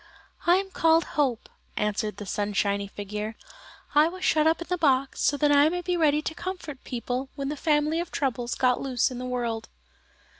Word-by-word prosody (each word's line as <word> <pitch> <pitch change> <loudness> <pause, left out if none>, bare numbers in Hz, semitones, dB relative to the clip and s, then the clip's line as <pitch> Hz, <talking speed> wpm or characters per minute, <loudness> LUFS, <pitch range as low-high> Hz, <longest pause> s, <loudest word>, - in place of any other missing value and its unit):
"I 350 - +7
am 385 +1 -1
called 330 -2 +4
Hope," 265 -6 0 0.3
answered 210 -1 -1
the 205 - -6
sunshiny 200 0 -1
figure. 210 +2 -5 0.6
"I 300 +2 +6
was 365 +2 -5
shut 310 0 +4
up 320 - +3
in 340 - -5
the 360 - 0
box 275 -5 +1
so 285 - +2
that 295 0 +3
I 290 +1 +6
might 355 +1 -3
be 360 -1 +1
ready 305 -3 +2
to 320 - -3
comfort 345 -6 -6
people 250 +2 -3
when 275 -1 -3
the 300 - -2
family 300 +2 +1
of 345 0 -3
troubles 245 -3 -2
got 250 -1 +2
loose 255 -2 +1
in 250 - -6
the 255 - -4
world." 235 -3 -3
275 Hz, 195 wpm, -26 LUFS, 235-320 Hz, 0.6 s, I